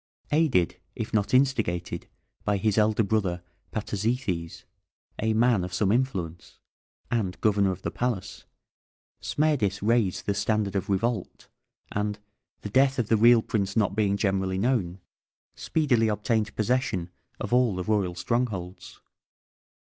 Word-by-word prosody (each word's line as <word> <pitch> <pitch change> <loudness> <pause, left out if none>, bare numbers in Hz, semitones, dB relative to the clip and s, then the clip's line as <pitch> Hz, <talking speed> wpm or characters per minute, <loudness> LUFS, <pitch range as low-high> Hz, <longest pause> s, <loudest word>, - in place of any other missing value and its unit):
Aided, 145 - +2 0.2
if - - -5
not 105 -2 +1
instigated, 110 -11 +1 0.4
by 105 -1 +1
his 105 +1 +1
elder 110 +1 +3
brother, 95 -4 -1 0.3
Patizithes, 105 -5 -2 0.6
a 110 0 +1
man 115 -4 +3
of 90 +1 -4
some 100 0 +2
influence, 95 -10 -2 0.5
and 100 -6 -1
Governor 100 -2 +3
of 95 +1 -7
the - - -2
Palace, 120 -6 -3 0.8
Smerdis 125 -11 0
raised 110 -4 +1
the 100 - +1
standard 100 0 0
of 95 - -2
revolt, 105 +1 -2 0.4
and, 105 0 -2 0.4
the 105 - -5
death 135 +3 +3
of 120 -4 -1
the 115 - +5
real 115 +1 +6
prince 100 -1 -1
not 100 -3 +2
being 100 -2 +1
generally 95 -2 0
known, 100 -5 0 0.6
speedily 130 -8 +1
obtained 105 0 0
possession 110 -6 0 0.3
of - - -4
all 125 -5 +3
the 90 - -3
royal 95 -3 0
strongholds. 95 -3 -3
105 Hz, 135 wpm, -26 LUFS, 95-120 Hz, 0.8 s, real